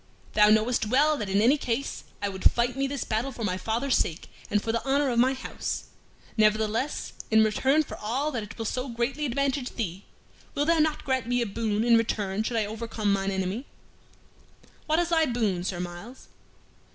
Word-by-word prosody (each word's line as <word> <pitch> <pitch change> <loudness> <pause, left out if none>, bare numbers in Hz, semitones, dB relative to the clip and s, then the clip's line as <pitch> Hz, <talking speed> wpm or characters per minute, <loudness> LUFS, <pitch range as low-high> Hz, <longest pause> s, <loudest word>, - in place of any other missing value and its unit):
Thou 210 0 +6
knowest 220 +1 +3
well 290 +6 +4
that 210 -5 -4
in 200 +2 +3
any 275 +6 +4
case 250 +3 -3 0.2
I 200 - +1
would 190 -1 +3
fight 240 +1 0
me 275 0 0
this 280 -1 -3
battle 225 +5 -1
for 235 -2 -7
my 185 -3 0
father's 225 +8 0
sake 165 +1 -1 0.2
and 210 - +2
for 225 - -2
the 230 0 -1
honor 275 0 +2
of 235 - +1
my 260 +2 +4
house; 260 - -4 0.5
nevertheless, 215 +5 +1 0.2
in 220 0 +5
return 265 +8 +2
for - - -9
all 260 +8 -1
that 245 -5 -2
it 210 0 -9
will 225 - -4
so 255 +4 -2
greatly 245 +5 -1
advantage 270 0 -1
thee, 195 -4 -4 0.5
wilt 290 +3 +1
thou 335 -1 +4
not 310 -1 +1
grant 260 -3 0
me 245 0 +1
a - - -2
boon 215 0 -1
in 235 -1 +5
return 210 -3 -1
should 230 +1 -1
I 215 - +2
overcome 215 -1 -2
mine 195 0 0
enemy?" 190 +7 -2 1.2
"What 310 +1 +2
is 345 0 +1
thy 320 -2 +3
boon, 215 -8 0
Sir 180 -1 -3
Myles?" 180 +8 -8
230 Hz, 200 wpm, -27 LUFS, 210-270 Hz, 1.2 s, Thou